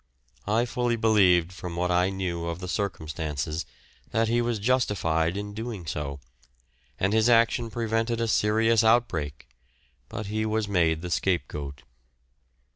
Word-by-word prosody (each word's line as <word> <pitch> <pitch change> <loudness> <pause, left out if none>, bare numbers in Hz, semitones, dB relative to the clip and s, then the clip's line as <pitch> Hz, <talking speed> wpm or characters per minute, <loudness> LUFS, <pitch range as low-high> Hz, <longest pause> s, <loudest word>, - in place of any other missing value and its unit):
I 115 +3 +2
fully 120 -1 0
believed 95 -6 +4
from 90 -2 -7
what 90 +1 0
I 90 +1 +3
knew 90 -3 -3
of 85 -1 -3
the 90 0 -7
circumstances 80 -5 -3 0.4
that 115 0 +1
he 120 +1 +2
was 120 -1 0
justified 100 -8 +1
in 105 0 -5
doing 110 -4 -5
so, 75 -2 -4 0.8
and 100 +2 +1
his 110 +2 +4
action 115 0 +3
prevented 115 +1 -1
a 115 - 0
serious 110 +1 +3
outbreak, 90 - +1 0.6
but 110 - -5
he 110 +2 -2
was 110 -1 0
made 85 -4 +1
the 90 - -5
scapegoat. 75 -8 -2
100 Hz, 140 wpm, -26 LUFS, 85-115 Hz, 0.8 s, believed